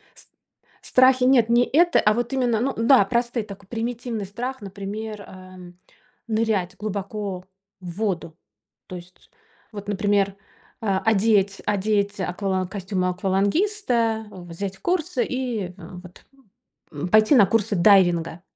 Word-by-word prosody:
С - - -21
страхи 255 0 +4
нет, 250 -3 +4
не 240 +1 +4
это, 345 +6 +3
а 210 - +3
вот 240 +3 -2
именно, 245 -4 +1
ну 270 +3 -1
да, 230 0 +5
простой 235 +1 -1
такой 200 -2 -12
примитивный 230 -1 -4
страх, 245 +7 -6
например, 205 +2 -7
э, 185 -2 -13 0.5
нырять 215 -5 -1
глубоко 200 -2 -5 0.4
в 180 -2 -8
воду. 180 -7 -2 0.5
То 185 - -7
есть, 180 +1 -15 0.4
вот 205 -2 -9
например, 200 -1 +1 0.5
а 195 -3 +1
одеть 205 -2 +2
одеть 205 0 0
аквалан 190 0 -2
костюмы 190 -1 -3
аквалангиста, 220 - 0
взять 185 +2 -7
курсы 335 - -1
и 240 -8 -3
вот, 180 0 -12 0.7
м, 150 +4 -5
пойти 215 +7 +5
на 210 -5 +7
курсы 210 0 0
дайвинга. 175 -3 +3
205 Hz, 125 wpm, -23 LUFS, 190-230 Hz, 0.7 s, на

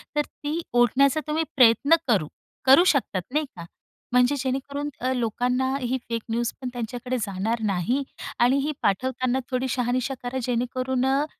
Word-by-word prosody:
तर 295 - +3
ती 300 +3 -5
ओढण्याचा 255 +5 +4
तुम्ही 315 +2 0
प्रयत्न 255 +5 +6
करू 195 -10 +2 0.4
करू 270 +7 +8
शकतात 245 - +1
नाही 305 0 +1
का? 170 -1 -8 0.5
म्हणजे 250 +3 +4
जेणेकरून 275 +3 -3
अ, 255 +1 -1
लोकांना 250 +2 0
ही 250 +1 -1
फेक 230 -1 -2
न्यूजपण 240 +2 -2
त्यांच्याकडे 245 +2 -3
जाणार 210 +4 -2
नाही. 215 +8 0 0.4
आणि 250 +3 +4
ही 305 - 0
पाठवताना 255 +5 0
थोडी 255 +1 0
शहानिशा 250 +2 0
करा 255 +2 -3
जेणेकरून 250 +1 -1
अ, 275 +3 +2
255 Hz, 145 wpm, -25 LUFS, 235-270 Hz, 0.5 s, करू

